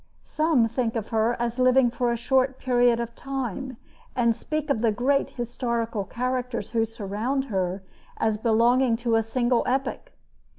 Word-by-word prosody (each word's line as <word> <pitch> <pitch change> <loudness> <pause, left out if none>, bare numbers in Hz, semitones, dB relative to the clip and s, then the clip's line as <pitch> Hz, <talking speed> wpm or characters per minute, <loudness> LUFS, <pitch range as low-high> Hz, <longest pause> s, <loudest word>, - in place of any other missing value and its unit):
Some 305 -7 +2
think 230 0 -2
of 220 -2 -3
her 225 +2 +1
as 240 +1 -2
living 255 -1 +4
for 245 0 0
a 235 - -1
short 260 +2 +1
period 245 -2 +2
of 235 0 -4
time 265 -1 -5 0.4
and 235 -2 +2
speak 305 +2 -3
of 225 - 0
the 230 -2 +3
great 265 +6 +1
historical 235 -3 -3
characters 250 -2 -3
who 225 -1 +2
surrounded 225 +5 -3
her 190 0 -1 0.3
as 220 -1 0
belonging 235 +2 +3
to 235 -1 -1
a 225 - +4
single 240 +2 +1
epoch. 270 +2 -2
240 Hz, 160 wpm, -25 LUFS, 225-255 Hz, 0.4 s, living